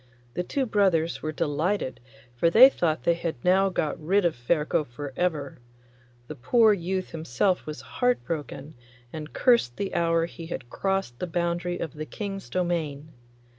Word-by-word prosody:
The 180 - -1
two 265 +9 -1
brothers 190 -7 +1
were 155 - -2
delighted, 155 +1 -1 0.4
for 165 +8 +3
they 250 +9 +9
thought 160 -7 -1
they 170 - +4
had 170 -1 -3
now 190 +2 +4
got 155 -4 -2
rid 190 +4 +2
of 170 - +1
Ferko 150 +6 0
for 140 +1 -8
ever. 155 -8 -2 0.7
The - - -6
poor 220 - +4
youth 185 0 -3
himself 165 +5 0
was 155 0 -6
heart 245 -1 0
broken, 150 -2 -5 0.4
and 155 -1 -7
cursed 235 - +3
the 200 - -3
hour 165 -1 +2
he 165 -1 -9
had 125 -7 -7
crossed 195 -11 -2
the 180 - -3
boundary 175 +1 -1
of 160 - -5
the 155 0 -6
King's 195 -3 -6
domain. 160 -5 -2
170 Hz, 165 wpm, -26 LUFS, 155-190 Hz, 0.7 s, they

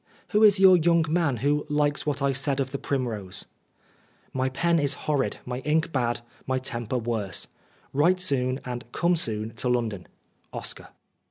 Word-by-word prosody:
" - - -31
Who 210 -1 +3
is 205 -3 +7
your 190 -1 +8
young 170 0 +3
man 155 -5 +1
who 150 +1 +2
likes 150 0 0
what 140 -1 -1
I 140 - +3
said 135 +1 +1
of 130 -1 -1
the 140 - -4
primrose? 115 -9 -3 0.4
" - - -35
My 130 0 0
pen 170 +5 +1
is 145 -1 +2
horrid, 145 -3 0
my 125 0 -4
ink 155 +4 0
bad, 120 -4 0 0.3
my 130 0 +1
temper 125 -1 -3
worse. 110 -5 -2 0.5
Write 175 +6 +3
soon, 130 -6 0
and 125 0 -6
come 175 +1 +2
soon 110 -7 -1
to 125 - -1
London. 115 -7 -1 0.2
" - - -41
OSCAR." - - -4
135 Hz, 180 wpm, -26 LUFS, 125-155 Hz, 0.5 s, your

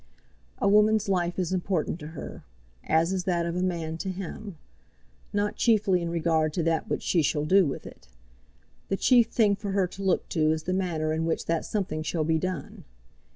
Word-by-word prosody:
A - - 0
woman's 210 +1 +4
life 180 -2 0
is 185 -1 -1
important 180 -3 -1
to 150 - -8
her, - - -8 0.4
as 165 +3 +2
is 185 -1 -2
that 175 -2 +1
of 170 0 -3
a 180 - -1
man 165 -3 -2
to 190 - -3
him, 190 0 -6 0.7
not 205 0 -1
chiefly 205 -6 +3
in 170 - -2
regard 160 -2 +1
to 170 - -1
that 165 -1 0
which - - -2
she 170 - +2
shall 150 0 0
do 185 +1 +5
with 135 - -5
it. - - -13 0.8
The 195 - -1
chief 240 0 +5
thing 210 -4 +3
for 200 -1 -5
her 195 -1 +2
to 185 +2 -9
look 190 -2 +1
to 155 -3 +2
is 160 0 -2
the 185 - -2
manner 165 -5 -1
in 160 +1 -1
which 165 - -1
that 165 -1 -1
something 185 -7 -2
shall 155 +1 -1
be 160 +1 +1
done. 180 -4 -5
180 Hz, 200 wpm, -27 LUFS, 160-195 Hz, 0.8 s, do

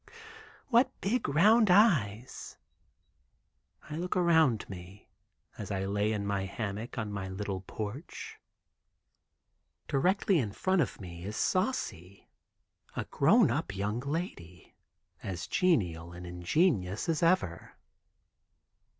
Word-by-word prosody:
Wuu, - - -38
wu, - - -20
w—— 460 -1 -15 0.5
"What 255 +2 +3
big, 220 - 0
round 210 +9 +5
eyes." 130 - +2 1.3
I 150 - -6
look 180 +2 -2
around 160 - +3
me, 95 +1 -11 0.5
as 105 - -5
I 95 -1 -2
lay 100 +2 0
in 105 -2 -2
my 100 -1 -1
hammock 105 +4 -5
on 110 -3 -3
my 95 -2 -4
little 95 0 -4
porch. 110 - -7 1.5
Directly 185 +5 +2
in 105 -7 -2
front 185 - +1
of 135 - -2
me 85 -3 -9
is 105 +3 -5
Saucy, 100 - -2 0.7
a - - -3
grown - - +4
up 100 - -2
young 105 +4 -2
lady, 125 - -5 0.5
as 90 -4 -5
genial 85 - +1
and 90 +1 -9
ingenuous 90 - 0
as 160 -2 0
ever. 165 - +1
110 Hz, 125 wpm, -30 LUFS, -, 1.5 s, round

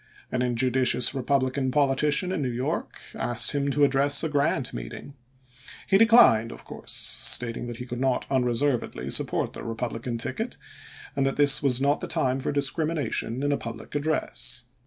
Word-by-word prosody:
An 125 - -1
injudicious 125 0 +2
Eepublican 130 0 0
politician 145 +6 +1
in 185 -5 -2
New 130 - -1
York 125 +2 -3
asked 120 0 +1
him 140 -1 -1
to 145 +1 +1
address 140 +1 +2
a 160 - -1
Grant 145 -3 0
meeting. - - -8 0.7
He 195 - +4
declined, 225 - +6
of - - -12
course, - - -8
stating 120 0 +1
that 120 -1 -6
he 125 - -7
could 125 -1 -6
not 130 -1 0
unreservedly 125 0 0
support - - 0
the - - -8
Eepub 115 +1 -4
lican 115 +1 -4
ticket, 115 - -3 0.6
and 135 - +1
that 135 - -1
this 145 -1 +5
was 130 -4 +1
not 140 +2 +1
the - - -5
time 135 -5 0
for - - -2
discrimination 145 -3 -1
in 145 - +1
a 140 - +1
public 115 -1 -8
address. 145 -5 -2
135 Hz, 170 wpm, -26 LUFS, 125-145 Hz, 0.7 s, declined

